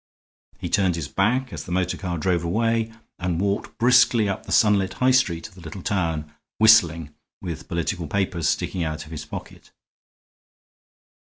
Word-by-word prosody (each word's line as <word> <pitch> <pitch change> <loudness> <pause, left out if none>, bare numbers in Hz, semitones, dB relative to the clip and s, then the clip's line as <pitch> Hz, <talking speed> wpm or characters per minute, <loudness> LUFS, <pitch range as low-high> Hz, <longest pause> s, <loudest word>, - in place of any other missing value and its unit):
He - - -5
turned 95 -3 +2
his 80 -5 -4
back 125 - 0
as - - -5
the 90 - -10
motor 90 0 0
car 90 -3 -4
drove 85 +1 0
away, 115 +5 0 0.3
and 90 -2 -1
walked 100 +2 -2
briskly 120 -2 +4
up 95 - -4
the - - -6
sunlit 100 -3 +3
high 130 +1 +2
street 95 -11 +1
of 105 - -19
the 90 - -14
little 85 +3 -8
town, 80 -7 -2 0.2
whistling, 85 -9 +5 0.3
with 85 -4 -6
political 85 0 -2
papers 95 -3 0
sticking 90 - -1
out 80 -1 -4
of 80 - -14
his 80 -1 -6
pocket. - - -9
95 Hz, 165 wpm, -23 LUFS, 85-105 Hz, 0.3 s, whistling